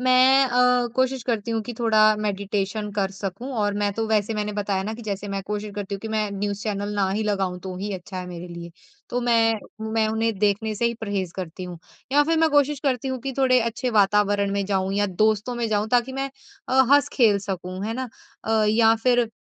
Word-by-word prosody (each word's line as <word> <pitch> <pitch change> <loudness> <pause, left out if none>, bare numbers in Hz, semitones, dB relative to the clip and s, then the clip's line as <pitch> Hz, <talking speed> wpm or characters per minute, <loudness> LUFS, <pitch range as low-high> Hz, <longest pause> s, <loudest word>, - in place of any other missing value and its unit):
मैं 255 +1 +5
अ, 250 0 +3
कोशिश 260 0 +1
करती 230 -2 -2
हूँ 225 -1 -1
कि 240 +2 -7
थोड़ा 225 -2 +3 0.2
मेडिटेशन 205 0 -2
कर 200 -2 -1
सकूँ। 200 +7 -5
और 205 -4 0
मैं 205 0 +1
तो 225 +1 -1
वैसे 215 0 +1
मैंने 210 0 -2
बताया 200 -2 -1
ना 215 +3 -4
कि 235 - -10
जैसे 205 -1 -4
मैं 195 0 -3
कोशिश 210 0 -4
करती 205 -1 -4
हूँ 195 - -6
कि 225 - -6
मैं 215 -1 -1
न्यूज़ 200 0 -3
चैनल 205 -1 -3
ना 200 -2 +1
ही 210 +3 -1
लगाऊँ 195 -4 -1
तो 185 0 -6
ही 205 +2 -4
अच्छा 185 +1 -7
है 180 - -5
मेरे 175 0 -8
लिए। 170 0 -8 0.4
तो 245 - -1
मैं 225 -2 +2 0.3
मैं 220 -1 +2
उन्हें 225 +1 0
देखने 210 +2 +1
से 235 - -2
ही 235 - -1
परहेज़ 200 -5 -3
करती 185 0 -6
हूँ, 175 -2 -8 0.3
या 290 - +6
फ़िर 325 +2 +1
मैं 320 0 +3
कोशिश 290 -1 +2
करती 265 -2 -1
हूँ 260 -1 -2
कि 270 +2 -4
थोड़े 255 -2 +4
अच्छे 235 +2 -2
वातावरण 205 0 +3
में 200 0 0
जाऊँ 190 -1 0
या 205 0 +2
दोस्तों 215 +5 +1
में 235 -2 -2
जाऊँ, 210 0 0
ताकि 245 +1 +2
मैं 270 +1 -3 0.4
अ, 265 +1 +5
हँस-खेल 240 -7 +4
सकूँ। 185 0 -4
है 225 - -3
ना? 260 +1 -4 0.4
अ, 220 -1 +2
या 225 +1 +5
फ़िर 240 0 +2
215 Hz, 220 wpm, -24 LUFS, 200-240 Hz, 0.4 s, या